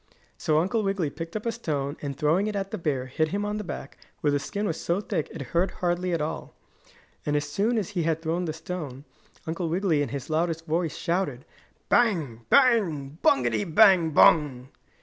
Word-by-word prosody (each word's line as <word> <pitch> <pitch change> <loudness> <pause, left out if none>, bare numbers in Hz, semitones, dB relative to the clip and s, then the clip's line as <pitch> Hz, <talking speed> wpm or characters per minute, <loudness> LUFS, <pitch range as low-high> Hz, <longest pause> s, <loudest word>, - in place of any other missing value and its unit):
So 155 - +1
Uncle 195 +8 +1
Wiggily 195 -7 -1
picked 165 +5 -7
up 215 - -4
a 230 - +1
stone, 145 -11 -3
and 140 -2 -4
throwing 160 +8 +2
it 210 - -3
at 195 -1 -3
the 215 - -4
bear, 140 -6 -1
hit 155 +4 0
him 200 +5 -2
on 210 0 -2
the 210 - -4
back, 145 -5 -7 0.2
where 145 - +2
the 145 - +1
skin 200 +9 -3
was 165 -5 -2
so 170 +3 0
thick 200 -7 -2
it 160 - -6
hurt 175 +2 +2
hardly 180 0 -1
at 165 -2 0
all. 160 +2 -5 0.7
And 150 - -1
as 145 0 0
soon 210 +10 0
as 205 -5 -1
he 190 -4 -2
had 160 -1 0
thrown 170 +2 -1
the 160 - -2
stone 155 -5 -6 0.4
Uncle 165 +1 -2
Wiggily 170 -3 +1
in 145 - -1
his 140 -1 -5
loudest 165 +1 -1
voice 165 0 -1
shouted: 165 -7 -2 0.4
"Bang! 155 - +1
Bang! 175 - +3
Bungity 120 -5 +3
bang 185 -1 +5
bung!" 145 -4 +4
165 Hz, 200 wpm, -26 LUFS, 145-195 Hz, 0.7 s, bang